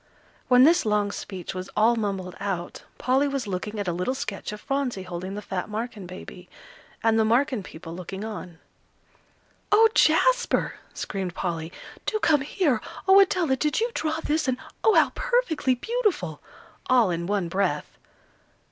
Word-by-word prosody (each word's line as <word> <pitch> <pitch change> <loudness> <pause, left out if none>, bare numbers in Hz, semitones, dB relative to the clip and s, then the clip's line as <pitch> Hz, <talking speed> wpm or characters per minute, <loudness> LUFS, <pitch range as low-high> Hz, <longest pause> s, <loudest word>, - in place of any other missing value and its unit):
When 250 0 +7
this 335 +5 +5
long 210 -2 +1
speech 190 -3 -6
was 185 0 -6
all 225 +3 +5
mumbled 195 -5 -3
out, 190 -3 -4
Polly 265 +3 +2
was 275 -3 -2
looking 205 +2 -4
at 200 - -3
a 175 - 0
little 180 +10 -1
sketch 205 -7 -4
of 210 - -7
Phronsie 265 -6 -2
holding 185 +1 -5
the 210 - -6
fat 190 -1 -4
Marken 215 -3 -5
baby, 180 0 -10 0.5
and 225 0 +3
the - - +5
Marken 240 +1 +2
people 165 -2 -10
looking 190 +3 -6
on. 180 -6 -7 1.1
"Oh, 445 +2 +7
Jasper!" - - +3 0.2
screamed 190 -3 -4
Polly, 165 -2 -3 0.4
"do 435 - +1
come 310 -9 +3
here! 290 - 0 0.3
Oh, 385 +1 +8
Adela, 365 -7 +3
did 300 - 0
you 465 +2 0
draw 315 -5 -1
this? 305 0 0
And 255 -1 +1 0.3
oh! 440 - +5
how - - +5
perfectly 480 - +1
beautiful!" 370 - -1 0.5
all 245 -7 +5
in 170 0 -2
one 200 -3 0
breath. 175 -4 -2
215 Hz, 160 wpm, -25 LUFS, 185-285 Hz, 1.1 s, Oh